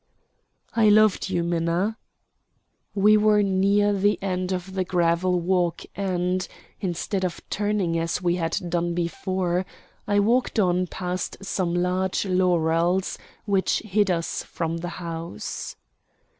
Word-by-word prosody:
"I 220 Hz, -2 st, +5 dB
loved 210 Hz, -2 st, +4 dB
you, 175 Hz, -2 st, 0 dB
Minna." 170 Hz, +5 st, 0 dB, 1.0 s
We 210 Hz, +2 st, +5 dB
were 210 Hz, 0 st, +4 dB
near 200 Hz, +2 st, +3 dB
the 205 Hz, +1 st, +2 dB
end 185 Hz, -1 st, -2 dB
of 185 Hz, +1 st, -4 dB
the 190 Hz, -1 st, 0 dB
gravel 180 Hz, 0 st, +1 dB
walk 175 Hz, -1 st, 0 dB
and, 185 Hz, -1 st, -1 dB, 0.3 s
instead 185 Hz, +1 st, -2 dB
of 180 Hz, -2 st, -2 dB
turning 205 Hz, -5 st, 0 dB
as 165 Hz, +1 st, -1 dB
we 175 Hz, -1 st, +1 dB
had 165 Hz, -1 st, -1 dB
done 170 Hz, 0 st, -1 dB
before, 180 Hz, +1 st, -1 dB, 0.4 s
I 205 Hz, -, +2 dB
walked 235 Hz, +5 st, +2 dB
on 180 Hz, -2 st, +2 dB
past 180 Hz, +1 st, -4 dB
some 180 Hz, -3 st, -1 dB
large 185 Hz, +2 st, 0 dB
laurels 180 Hz, -1 st, +1 dB, 0.3 s
which 195 Hz, -2 st, +1 dB
hid 205 Hz, -1 st, +2 dB
us 170 Hz, -2 st, -1 dB
from 165 Hz, -1 st, -3 dB
the 175 Hz, +1 st, -4 dB
house. 165 Hz, -, -6 dB
185 Hz, 130 wpm, -24 LUFS, 175-195 Hz, 1.0 s, I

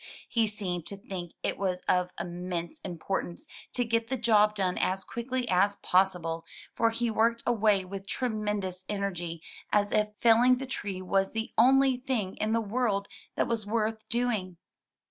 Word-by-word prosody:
He 230 Hz, -2 st, +2 dB
seemed 185 Hz, -5 st, -3 dB
to 200 Hz, -, -6 dB
think 180 Hz, -3 st, -7 dB
it -, -, -1 dB
was 185 Hz, -2 st, -1 dB
of 180 Hz, 0 st, +2 dB
immense 175 Hz, -1 st, -4 dB
importance 175 Hz, -, -4 dB, 0.3 s
to 245 Hz, -, +1 dB
get 230 Hz, 0 st, 0 dB
the 265 Hz, +2 st, -1 dB
job 215 Hz, -3 st, +4 dB
done 185 Hz, -3 st, 0 dB
as 190 Hz, +1 st, 0 dB
quickly 250 Hz, +1 st, -3 dB
as 200 Hz, +1 st, +3 dB
possible, 180 Hz, -4 st, +1 dB, 0.3 s
for 230 Hz, -, +3 dB
he 230 Hz, 0 st, -1 dB
worked 230 Hz, +2 st, +2 dB
away 210 Hz, -5 st, +3 dB
with 195 Hz, +1 st, -7 dB
tremendous 210 Hz, -6 st, -2 dB
energy 175 Hz, -5 st, -3 dB, 0.3 s
as 205 Hz, 0 st, +2 dB
if 210 Hz, 0 st, +3 dB
fell 230 Hz, -1 st, +6 dB
ing 255 Hz, +1 st, +5 dB
that 265 Hz, 0 st, -6 dB
tree 195 Hz, -6 st, -4 dB
was 195 Hz, +1 st, +1 dB
the 225 Hz, 0 st, -3 dB
only 265 Hz, +2 st, +5 dB
thing 245 Hz, -7 st, -2 dB
in 215 Hz, +1 st, 0 dB
the 230 Hz, -, +3 dB
world 215 Hz, -2 st, 0 dB, 0.3 s
that -, -, +1 dB
was 225 Hz, -3 st, -2 dB
worth 220 Hz, 0 st, -1 dB
doing. 220 Hz, -7 st, 0 dB
210 Hz, 165 wpm, -29 LUFS, 185-230 Hz, 0.3 s, fell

